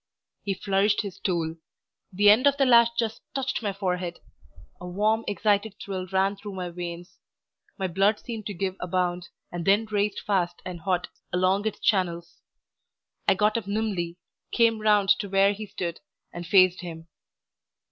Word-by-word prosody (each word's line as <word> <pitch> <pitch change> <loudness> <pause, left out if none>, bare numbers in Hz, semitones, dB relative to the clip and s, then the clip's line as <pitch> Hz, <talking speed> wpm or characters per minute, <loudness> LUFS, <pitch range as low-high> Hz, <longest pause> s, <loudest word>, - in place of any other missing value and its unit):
He 195 -2 -2
flourished 200 +2 +1
his 200 -4 -8
tool. 165 -3 -1 0.5
The 205 +2 +6
end 245 +7 +5
of 280 0 +3
the 275 - +3
lash 235 -2 +7
just 225 -2 -1
touched 265 -2 -1
my 205 -3 -1
forehead. 180 -3 -3 0.6
A 180 - -8
warm 215 +5 +1
excited 205 0 +1
thrill 185 -2 -5
ran 190 +2 +1
through 205 0 -9
my 180 -2 -4
veins, 175 0 -7 0.6
my 190 - -2
blood 195 +4 +2
seemed 225 -4 -6
to 205 - -5
give 185 +1 -2
a 180 - -4
bound, 180 -1 -1 0.2
and 175 -1 -4
then 200 +5 +3
raced 210 -1 -1
fast 175 -4 -1
and 180 -2 -6
hot 180 0 -1 0.2
along 185 +3 +2
its 215 - -4
channels. 170 -4 0 0.9
I - - +5
got 210 +3 +2
up 200 - -13
nimbly, 200 -5 -2 0.3
came 230 -2 +3
round 210 -2 +3
to 200 - -4
where 195 +1 +4
he 210 +1 -7
stood, 170 -3 -5 0.3
and 175 -1 -7
faced 185 -1 +5
him. 165 -2 -8
195 Hz, 165 wpm, -26 LUFS, 180-210 Hz, 0.9 s, lash